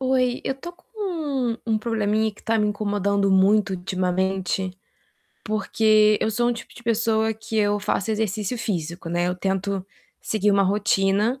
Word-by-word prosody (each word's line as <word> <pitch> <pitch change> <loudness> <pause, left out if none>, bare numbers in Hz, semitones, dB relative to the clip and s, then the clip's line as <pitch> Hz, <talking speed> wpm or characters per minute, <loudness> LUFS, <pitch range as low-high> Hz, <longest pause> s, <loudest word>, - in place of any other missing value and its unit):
Oi, 255 -1 +1
eu 270 - -1
tô 345 +6 -9
com 355 - -27
um 295 - -2
um 220 -1 +1
probleminha 220 -1 0
que - - -19
tá 225 0 +1
me 210 - +2
incomodando 200 -1 0
muito 195 +2 +4
ultimamente, 185 +1 -1 0.7
porque 215 0 +3
eu 220 - +1
sou 240 +3 +1
um - - +2
tipo 235 0 -9
de - - -13
pessoa 225 -1 +1
que 220 +1 -6
eu 205 -1 +2
faço 210 0 -1
exercício 215 +1 -1
físico, 170 -6 -3
né, 175 +1 0
eu 180 - -1
tento 195 +1 -2 0.4
seguir 210 -1 +1
uma 200 0 +4
rotina 200 +4 +1
210 Hz, 165 wpm, -23 LUFS, 195-225 Hz, 0.7 s, muito